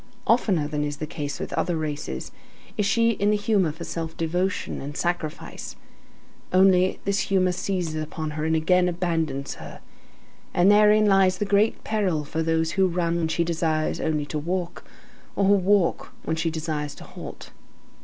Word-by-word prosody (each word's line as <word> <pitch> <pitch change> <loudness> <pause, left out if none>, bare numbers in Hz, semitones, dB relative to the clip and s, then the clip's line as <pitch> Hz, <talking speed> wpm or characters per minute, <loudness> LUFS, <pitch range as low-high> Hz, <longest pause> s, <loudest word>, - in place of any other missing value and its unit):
Oftener 195 -10 +2
than 150 0 -2
is 145 0 -3
the 155 - -4
case 145 -1 -5
with - - -5
other 175 -2 0
races, 150 -2 -4 0.4
is 210 -2 +1
she 230 +2 +3
in 205 -2 0
the 210 - +3
humor 205 -5 +1
for 165 +3 -9
self 165 -1 -5
devotion 180 +4 -1
and 145 +1 -6
sacrifice. 175 -3 -3 0.8
Only, 185 0 +4
this 200 +1 +1
humor 185 -2 +3
seizes 175 -4 -2
upon 155 0 -4
her, 150 +1 -4
and 160 0 +1
again 180 +3 +3
abandons 165 -6 -2
her. - - -9 0.8
And 180 +3 +5
therein 210 +1 +6
lies 195 -2 +4
the 205 - -1
great 205 +2 +2
peril 190 -8 0
for 160 +2 -3
those 160 0 +1
who 190 +1 +3
run 170 -1 0
when 165 -1 0
she 170 +1 0
desires 160 -2 0
only 150 -2 0
to 150 +1 -3
walk, 175 +2 -3 0.5
or 200 - +2
who 200 - +5
walk 195 -2 +2
on - - -22
when 160 - -1
she 165 +1 0
desires 155 -2 -3
to - - -11
halt. - - -10
170 Hz, 175 wpm, -25 LUFS, 155-195 Hz, 0.8 s, therein